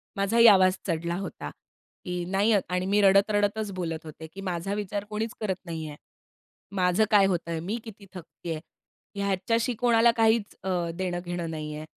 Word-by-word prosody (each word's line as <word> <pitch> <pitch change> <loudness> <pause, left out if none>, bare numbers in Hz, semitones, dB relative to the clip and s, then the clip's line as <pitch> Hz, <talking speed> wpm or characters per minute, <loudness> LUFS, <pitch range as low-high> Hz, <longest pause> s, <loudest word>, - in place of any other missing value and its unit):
माझाही 225 +4 +5
आवाज 185 -2 +6
चढला 170 0 -1
होता, 195 - -6 0.6
की 180 -1 -3
नाही 205 +4 +3 0.2
आणि 180 0 -1
मी 205 +2 +2
रडत 195 +1 +5
रडतच 205 0 0
बोलत 165 -3 -4
होते, 160 +1 -9
की 190 +5 -10
"माझा 185 +1 -3
विचार 205 0 -3
कोणीच 215 +1 -3
करत 200 -4 -1
नाही 160 -2 -5
आहे. 145 0 -9 0.8
माझं 180 +2 +3
काय 205 -2 +6
होतंय, 170 -3 -1
मी 195 +8 -3
किती 215 -3 -11
थकती 175 -1 -10
आहे. 155 - -3 0.6
ह्याच्याशी 200 +5 0
कोणाला 235 0 +4
काहीच 225 -1 +2
अ, 190 - -3 0.3
देणं-घेणं 175 -2 -3
नाही 155 -1 -5
आहे." 155 +1 -7
190 Hz, 165 wpm, -27 LUFS, 175-210 Hz, 0.8 s, आवाज